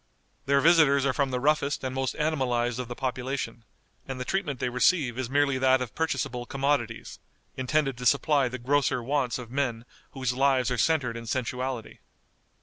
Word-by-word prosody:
Their 140 0 +4
visitors 150 -4 +5
are 135 - +2
from 140 -2 0
the 125 -1 -2
roughest 145 +1 +1
and 130 -1 -3
most 135 -1 -2
animalized 125 -6 0
of 125 - -4
the 120 - -6
population, 130 -2 -4 0.4
and 135 -1 -5
the 125 - -4
treatment 155 -6 -2
they 125 - -1
receive 125 0 +2
is 130 -1 -3
merely 140 -1 +2
that 130 0 +4
of 125 -4 -5
purchasable 130 -6 -2
commodities, 135 -4 -2 0.4
intended 135 -1 0
to 125 - 0
supply 140 +1 +3
the 125 - -5
grosser 130 0 +1
wants 130 -2 0
of 120 -2 -9
men 125 -4 -2 0.3
whose 130 -3 -1
lives 130 -1 +2
are 125 - -1
centred 140 -8 +1
in 115 0 -7
sensuality. 125 0 -3
130 Hz, 175 wpm, -27 LUFS, 125-140 Hz, 0.4 s, visitors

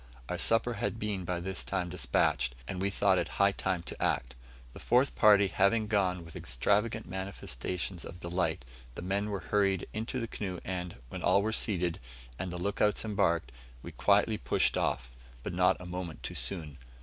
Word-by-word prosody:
Our - - -2
supper 115 +2 +3
had 115 - -2
been 105 -4 -2
by 90 0 -1
this 95 -6 -2
time 90 +8 -2
despatched, 60 -5 +1
and 90 +6 -4
we 100 - +2
thought 95 -1 +3
it - - -1
high 100 0 +5
time 95 -3 -1
to - - -7
act. 60 +1 0 0.4
The - - -10
fourth 125 +3 +3
party 105 -2 +6
having 100 +7 +3
gone 95 -5 +1
with 80 - -12
extravagant 105 - +1
manifestations 90 -2 -4
of 85 - -9
delight, 85 -7 -1 0.3
the - - -6
men 100 +3 -1
were 100 -2 -3
hurried 100 -3 +2
into 115 +4 -3
the 115 - -2
canoe, 95 -5 -4
and, 90 -2 -3
when - - -6
all 100 - +4
were 110 +1 0
seated, 90 -7 0 0.4
and 95 -1 -3
the 90 - -4
look 100 +4 -2
outs 105 +1 +2
embarked, 95 - +1 0.3
we - - -7
quietly - - +3
pushed - - +2
off, - - -1 0.3
but - - -4
not 90 +1 +4
a 90 - -9
moment 90 -2 -6
too - - -4
soon. 80 -7 -3
95 Hz, 185 wpm, -31 LUFS, 85-100 Hz, 0.4 s, party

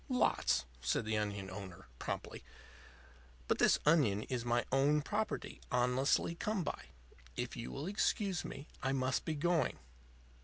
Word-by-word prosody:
"Lots," 65 - +2 0.2
said 110 - +1
the 110 0 0
onion 100 -2 -3
owner, 95 -1 -8
promptly. - - -4 1.0
"But - - +1
this - - +6
onion 135 -10 +4
is 125 -3 -2
my 120 0 +1
own 145 +3 +4
property, 210 +5 -2
honestly 125 +6 +2
come 200 +2 -1
by. - - -4 0.5
If - - -2
you 65 - -5
will 145 - -4
excuse 195 -2 +1
me, 140 - -7
I 135 - +1
must 130 -1 0
be 160 - -1
going." 170 +2 +1
135 Hz, 145 wpm, -35 LUFS, 110-165 Hz, 1.0 s, this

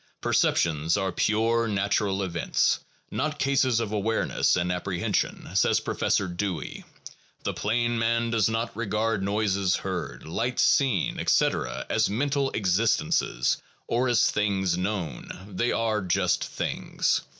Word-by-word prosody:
Perceptions 80 +2 +1
are 95 -1 -1
pure 115 +4 +1
natural 100 -1 0
events, 85 -3 +1 0.3
not 150 -1 -2
cases 130 -3 +2
of 110 -3 -3
awareness, 110 +1 +1
and 90 +1 0
appre 90 +1 -3
hensions, - - -1
says - - +3
Professor 100 - 0
Dewey; 90 -3 -4 0.6
the - - -1
plain 120 +2 0
man 115 0 +1
does 115 -2 +2
not 115 0 -2
regard 110 -1 -1
noises 100 -2 +1
heard, 90 -10 -5
light 115 +10 -2
seen, 130 - +2
etc., - - +1
as - - +1
mental 140 +5 0
existences 100 -4 +1 0.3
or 125 +2 +1
as 120 -3 +3
things 95 -4 0
known; 90 - -3 0.2
they 105 +5 -1
are 110 -2 0
just 90 0 +1
things. - - -1
105 Hz, 130 wpm, -26 LUFS, 95-115 Hz, 0.6 s, says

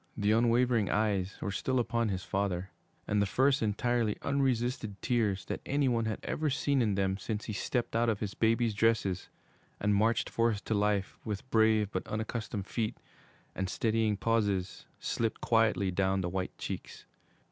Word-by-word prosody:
The 105 0 +2
unwavering 115 -1 +3
eyes 105 -3 0
were 100 - -2
still 130 +7 -1
upon 115 -1 0
his 95 -2 -2
father, 95 -1 -2 0.4
and 105 -1 +2
the 100 - +2
first 135 +7 +3
entirely 110 +1 +1
unresisted 125 -6 0
tears 105 -6 0
that - - -4
any 140 0 +1
one 115 -2 +1
had 110 -1 -1
ever 155 0 -1
seen 140 0 +1
in 105 -4 +1
them 95 0 0
since 105 +1 -4
he 110 - -4
stepped 120 +4 -2
out 115 0 +3
of 105 -3 0
his 100 -2 -3
baby's 115 0 +2
dresses 100 -4 +1 0.5
and 105 0 +2
marched 110 +3 +2
forth 115 -3 0
to - - 0
life, 105 -1 0
with 105 +1 -4
brave 110 -2 +3
but - - -3
unaccustomed 110 -2 -3
feet, 110 +1 -2 0.6
and 95 -1 -3
steadying 110 0 +1
pauses, 100 -4 0
slipped 115 -2 -1
quietly 110 -4 +2
down 95 +1 +1
the 90 - -2
white 95 +1 -3
cheeks. - - -6
110 Hz, 170 wpm, -31 LUFS, 100-115 Hz, 0.6 s, unwavering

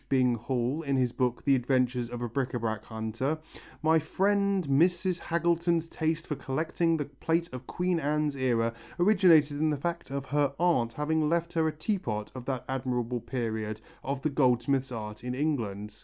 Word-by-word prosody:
Bing 130 -2 +3
Hall 125 +5 -1
in 140 -3 0
his 125 -2 +2
book 125 -1 -1
The 140 - +5
Adventures 125 -1 +1
of 120 0 -5
a - - -1
Bric 130 +2 -2
à 120 - -1
brac 110 -2 -2
Hunter, 110 +7 -2 0.5
"my 160 +1 +5
friend 200 +2 +1
Mrs. 175 +5 +2
Haggleton's 170 0 +1
taste 160 0 -1
for - - -2
collecting 160 +5 0
the 145 - -2
plate 165 +4 -1
of 130 0 -7
Queen 180 -1 0
Anne's 150 -1 0
era 120 -3 +1 0.3
originated 175 -7 +5
in 155 0 +2
the 150 - 0
fact 170 +2 -3
of 140 0 -3
her 145 -1 +1
aunt 160 -10 +2
having 155 +1 +1
left 170 +1 0
her 160 -2 +2
a - - +1
teapot 155 - -3
of 130 -2 -8
that 130 -3 -3
admirable 125 -2 -1
period 110 -3 -3 0.2
of 135 0 -3
the 155 - +1
goldsmith's 130 0 +2
art 105 -2 -6
in 125 0 -3
England. 110 -8 -2
140 Hz, 180 wpm, -29 LUFS, 120-160 Hz, 0.5 s, The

